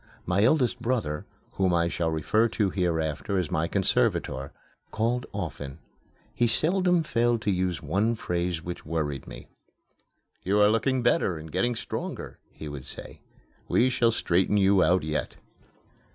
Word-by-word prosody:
My 90 +3 +2
eldest 130 0 +2
brother, 110 -12 -2 0.2
whom 95 -2 +1
I 85 0 +2
shall 85 -1 -1
refer 80 +9 +2
to 105 -3 0
hereafter 80 -2 -1
as 90 -5 -1
my 80 +1 0
conservator, 70 -8 0 0.4
called 120 +3 -1
often. 75 -7 -5 0.6
He 120 - +2
seldom 175 +6 +2
failed 120 -5 +1
to 105 - +1
use 90 -3 -1
one 100 +10 +1
phrase 85 -4 -2
which 90 0 -6
worried 75 -3 -3
me. - - -10 0.9
"You 100 +3 +1
are 105 0 +6
looking 120 +3 +1
better 105 -7 +2
and 80 0 -9
getting 120 +7 +1
stronger," - - -5
he 80 - -9
would 70 -3 -7
say. - - -10 0.5
"We 130 +1 +3
shall 120 -2 +3
straighten 95 -2 +1
you 100 -1 +4
out 90 0 +3
yet." 75 0 -3
95 Hz, 150 wpm, -27 LUFS, 80-115 Hz, 0.9 s, are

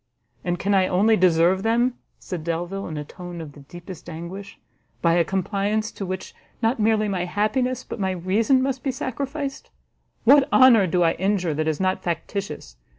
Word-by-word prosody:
"And 175 0 -1
can 200 +4 0
I 190 -1 +4
only 210 +5 +3
deserve 180 0 +3
them," 235 +3 +2 0.2
said 175 -4 -6
Delvile, 175 +4 -3
in 155 - -5
a 150 - -4
tone 175 +1 -9
of 160 -3 -7
the 145 - -15
deepest 175 +5 -11
anguish, 175 +5 -8 0.4
"by 170 -1 +3
a 170 0 +4
compliance 200 +4 -1
to 195 - -6
which 185 0 -5 0.3
not 230 +1 +1
merely 215 0 +2
my 185 -3 -1
happiness, 215 +7 0
but - - -7
my 190 -1 0
reason 205 +9 +2
must 265 -1 -1
be 270 - -2
sacrificed? 275 +2 -4 0.5
What 275 +3 +5
honour 240 -7 +6
do 175 +1 +2
I 165 - +4
injure 190 -3 0
that 155 +1 -1
is 155 -2 0
not 185 0 0
factitious? 170 - -4
190 Hz, 180 wpm, -23 LUFS, 175-225 Hz, 0.5 s, honour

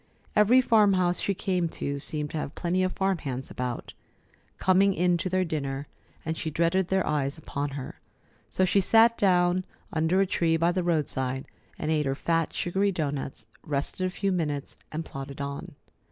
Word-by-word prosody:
Every 220 +5 +6
farm 215 -5 +4
house 180 -1 +1
she 200 - -1
came 180 -2 0
to 140 0 -2
seemed 150 +1 -3
to - - -3
have 150 - -5
plenty 180 +2 0
of 185 0 0
farmhands 155 -10 -2
about, 125 -1 -4 0.6
coming 190 +1 +4
in 175 +1 +3
to 185 - -2
their 185 0 +1
dinner, 140 -3 -3 0.4
and 160 0 -1
she 160 - -3
dreaded 170 +4 +1
their 190 0 +1
eyes 145 -1 -1
upon 145 -2 -4
her. 130 - -7 0.5
So 185 +11 +2
she 195 +2 +3
sat 230 +4 +5
down 180 -2 +3 0.3
under 160 +4 +2
a 195 - +4
tree 165 -3 +1
by 170 +2 +3
the 185 +1 0
roadside 135 -6 -1 0.3
and 155 - -2
ate 150 -2 +1
her 135 - 0
fat, 165 +2 0
sugary 195 +3 0
doughnuts, 140 - -3 0.2
rested 145 +5 -3
a - - -2
few 195 +1 -1
minutes, 150 -6 -2 0.2
and 160 +1 -4
plodded 135 0 -7
on. 140 0 -5
165 Hz, 180 wpm, -27 LUFS, 145-185 Hz, 0.6 s, Every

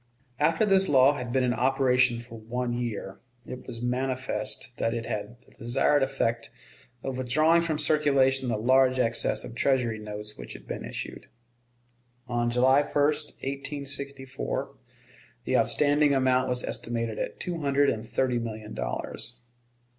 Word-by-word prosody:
After 165 +7 +3
this 195 -1 +3
law 135 0 +6
had 125 -4 -5
been 130 +1 +2
in 125 -1 +2
operation 125 -2 +2
for 115 -1 -10
one 120 +2 -3
year, 115 -5 -4 0.3
it 125 - -8
was 115 0 -6
manifest 130 0 -2
that 115 +1 0
it 115 -1 -3
had 115 +1 -5
the - - -24
desired 120 +5 +1
effect 115 -3 0 0.5
of 130 -1 -3
withdrawing 155 +7 +3
from 165 -2 -1
circulation 140 -4 +3
the 110 - 0
large 130 +3 +4
excess 115 -2 +1
of - - -8
Treasury 120 -3 +1
notes 105 0 -7
which - - -8
had - - -12
been - - -5
issued. - - -6 1.0
On 120 -1 0
July 130 +3 +4
1, - - -7
1864, 140 -2 -2 0.7
the - - 0
outstanding 145 -1 +3
amount 130 -1 +2
was 125 0 0
estimated 115 -1 -3
at - - -4
two 175 -2 -3
hundred 140 -1 +3
and 110 - -4
thirty 125 +1 0
million 110 -2 -6
dollars. 120 +1 -4
130 Hz, 145 wpm, -27 LUFS, 120-140 Hz, 1.0 s, law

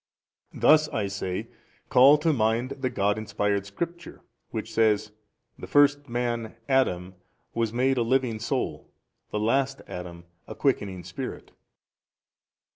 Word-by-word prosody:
A. - - -12
Thus 155 0 +5
I 105 - -1
say: 95 -2 -4 0.4
call 135 +4 +7
to 155 +1 +1
mind 115 +1 +1
the 135 -2 -2
God 105 -3 0
inspired 105 -2 -1
Scripture 170 +10 -6 0.3
which - - -5
says, 110 -2 +2 0.5
The - - -7
first 145 -1 +3
man 120 -2 -2
Adam 95 -10 +1 0.4
was 115 -2 0
made 130 +3 +1
a - - +2
living 120 -1 +1
soul, 110 - -3 0.4
the 105 - -2
last 135 +5 0
Adam 85 -1 -8 0.2
a - - -7
quickening 100 -10 -1
spirit. - - -7
115 Hz, 130 wpm, -26 LUFS, 105-135 Hz, 0.5 s, call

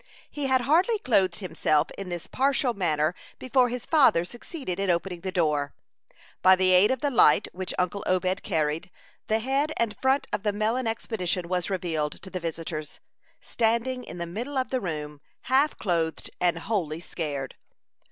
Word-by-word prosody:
He 290 -2 -3
had 260 -1 +3
hardly 345 - +3
clothed 195 - +2
himself 155 -5 0
in 195 -2 -7
this 175 -2 -5
partial 270 -2 +1
manner 160 -5 +1 0.2
before 255 -1 +2
his 245 0 -5
father 270 - +4
succeeded 240 - -6
in 195 -1 0
opening 175 0 -1
the 190 +1 -3
door. 150 -5 0 0.7
By 185 0 +7
the 185 0 +2
aid 185 +3 +6
of 260 -2 0
the 285 - +1
light 190 - +5
which 185 0 -4
uncle 180 +3 -1
Obed 185 +1 +1
carried, 160 0 -1 0.4
the 220 - +2
head 270 +6 0
and 230 -3 0
front 265 +2 +1
of - - 0
the 210 0 0
melon 225 +4 0
expedition 190 -6 -2
was 180 0 -1
revealed 165 -6 -1
to 190 - -9
the 185 - -3
visitors, 160 -2 -5 0.4
standing 235 +3 0
in - - -9
the 170 - -3
middle 235 +11 -5
of 260 - 0
the 260 -1 0
room, 150 -4 -5 0.2
half 275 +4 +2
clothed 165 -5 -1
and 175 -2 +2
wholly 165 -5 -2
scared. 145 -6 -4
190 Hz, 170 wpm, -26 LUFS, 170-245 Hz, 0.7 s, By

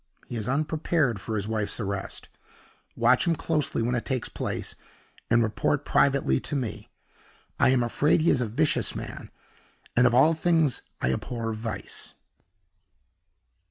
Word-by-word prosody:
He - - -6
is 110 0 -3
unprepared 150 - 0
for 110 - -3
his 100 -1 -2
wife's 110 0 -2
arrest. 100 -2 -4 0.7
Watch - - +3
him 170 - +3
closely 150 -6 0
when 120 +2 0
it 120 - -1
takes 130 -4 -2
place, - - -4 0.6
and 115 0 +4
report 115 +6 0
privately 140 0 +3
to - - -3
me. 110 -6 -4 0.7
I - - +5
am 130 -2 +3
afraid 145 +7 +2
he 165 - +4
is 130 - +2
a 120 - 0
vicious 145 +8 +1
man; - - -7 0.7
and 125 +1 +6
of 120 - +2
all 150 +6 +6
things 160 -4 +2 0.2
I 65 - +2
abhor 115 - -3
Vice." 110 -2 -5
125 Hz, 150 wpm, -26 LUFS, 110-150 Hz, 0.7 s, and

